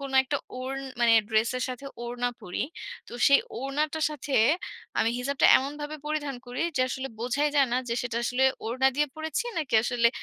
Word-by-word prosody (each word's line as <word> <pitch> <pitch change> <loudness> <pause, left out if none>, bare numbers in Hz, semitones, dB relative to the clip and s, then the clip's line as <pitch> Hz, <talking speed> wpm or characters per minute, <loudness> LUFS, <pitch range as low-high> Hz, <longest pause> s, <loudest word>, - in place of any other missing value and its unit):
কোনো 275 -1 -5
একটা 270 +2 -1 0.2
ওড়ন 270 +1 -4 0.2
মানে 235 -1 +5 0.2
ড্রেসের 235 +3 +1
সাথে 255 +2 -6 0.2
ওড়না 245 +1 -1
পরি, 180 - -3 0.5
তো - - -12 0.2
সেই 280 - +6 0.2
ওড়নাটার 300 +3 -1
সাথে 290 -1 -6 0.7
আমি 230 - +3
হিজাবটা 270 +2 +2
এমনভাবে 295 +3 -5
পরিধান 295 -3 -2
করি 245 +4 -3
যে, - - +2
আসলে 265 +2 -4
বোঝাই 265 +5 +1
যায় 275 - +5
না - - +3
যে 235 - 0
সেটা 240 -2 -3
আসলে 250 +2 +2 0.2
ওড়না 260 +4 +2
দিয়ে 295 0 +3
পড়েছি, 315 +9 -2
নাকি 290 -7 -2
আসলে 240 -1 +3
265 Hz, 175 wpm, -27 LUFS, 245-290 Hz, 0.7 s, সেই